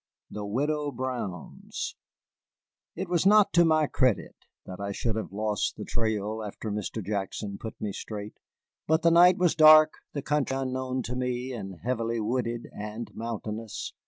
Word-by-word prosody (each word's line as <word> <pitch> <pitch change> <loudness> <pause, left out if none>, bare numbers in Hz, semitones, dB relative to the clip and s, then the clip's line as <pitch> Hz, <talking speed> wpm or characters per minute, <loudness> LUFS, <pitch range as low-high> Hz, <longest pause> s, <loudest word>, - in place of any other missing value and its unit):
THE 105 -1 -5
WIDOW 145 +6 -1
BROWN'S 120 - -5 1.0
It 185 +3 -3
was 175 +1 +2
not 210 0 +6
to 175 - +6
my 155 -2 +4
credit 130 -5 +1 0.3
that 90 0 -8
I 100 0 -3
should 110 +2 -2
have 110 - -4
lost 105 0 -1
the - - -6
trail, 110 -1 -1
after 105 +1 -5
Mr. 105 0 -4
Jackson 100 0 -3
put 110 - -7
me 105 -2 -3
straight. 105 +1 -7 0.5
But 160 +1 +2
the 170 - +5
night 175 +2 +7
was 180 -2 +3
dark, 155 0 +8 0.2
the 140 - -4
country 145 -2 0
unknown 130 -1 -2
to 125 - -4
me, 125 0 -2
and 95 -7 -7
heavily 115 -1 -1
wooded 120 +1 -2
and 105 +1 -6
mountainous. 110 -1 -5
115 Hz, 160 wpm, -28 LUFS, 105-145 Hz, 1.0 s, dark